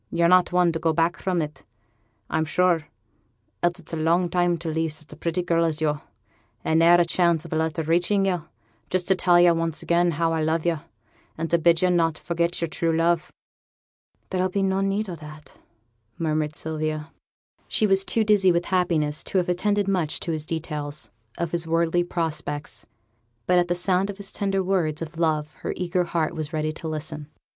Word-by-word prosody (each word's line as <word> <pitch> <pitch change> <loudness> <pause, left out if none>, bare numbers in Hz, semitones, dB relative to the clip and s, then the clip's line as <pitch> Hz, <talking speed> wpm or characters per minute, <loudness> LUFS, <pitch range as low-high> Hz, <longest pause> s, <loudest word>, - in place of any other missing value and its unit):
Yo're 170 0 +2
not 180 +1 +5
one 180 -1 +3
to 165 - -3
go 165 0 +1
back 165 +2 +1
from 180 -4 0
it, 150 0 -8 0.6
I'm 160 0 0
sure, 165 -1 +1 0.7
else 175 +1 +1
it's 170 - -12
a - - -1
long 170 +3 +2
time 175 -1 +2
to 170 0 -7
leave 160 0 -1
such 155 -1 -10
a - - -10
pretty 170 +1 -2
girl 170 -1 +2
as 160 -2 0
yo', 150 -2 0 0.6
and 160 0 +2
ne'er 170 +1 +6
a 175 - +4
chance 170 -1 +1
of 165 - -6
a - - 0
letter 160 0 -1
reaching 175 +5 +2
yo' 180 -4 -1 0.4
just 185 -1 0
to 190 - +5
tell 175 -1 +4
yo' 175 -1 +6
once 165 -1 -2
again 175 +1 +2
how 165 0 +1
I 160 - 0
love 160 +1 0
yo', 170 -3 +1 0.6
and 165 0 -3
to 170 - +4
bid 170 +1 +3
yo' 180 - +4
not 165 -3 +2
forget 170 0 -1
yo'r 170 - 0
true 165 0 0
love.' 170 +1 +1 1.0
'There'll 185 0 +1
be 195 +1 -1
no 190 0 +1
need 195 +2 0
o' 180 - -5
that,' 155 -2 -12 0.6
murmured 155 -2 -1
Sylvia. 155 0 -3 0.6
She 215 - +1
was 195 -1 +4
too 225 +3 +1
dizzy 205 -3 +4
with 170 0 0
happiness 165 -5 0
to - - -1
have 180 -1 +1
attended 205 +3 +1
much 180 -6 0
to 170 - -2
his 155 -1 -3
details 150 -7 -4 0.3
of 170 -2 -2
his 170 -1 -1
worldly 165 +1 +2
prospects, 155 -4 -4 0.6
but 180 +5 +4
at 175 - +1
the 175 - 0
sound 185 +2 +1
of 200 - -6
his 200 -1 -4
tender 195 -1 0
words 170 -5 0
of 165 +1 -9
love 155 -2 0
her - - -4
eager 180 0 0
heart 165 -2 -1
was 155 -1 -5
ready 155 0 -1
to 160 - -7
listen. 155 -1 -4
170 Hz, 205 wpm, -24 LUFS, 160-180 Hz, 1.0 s, ne'er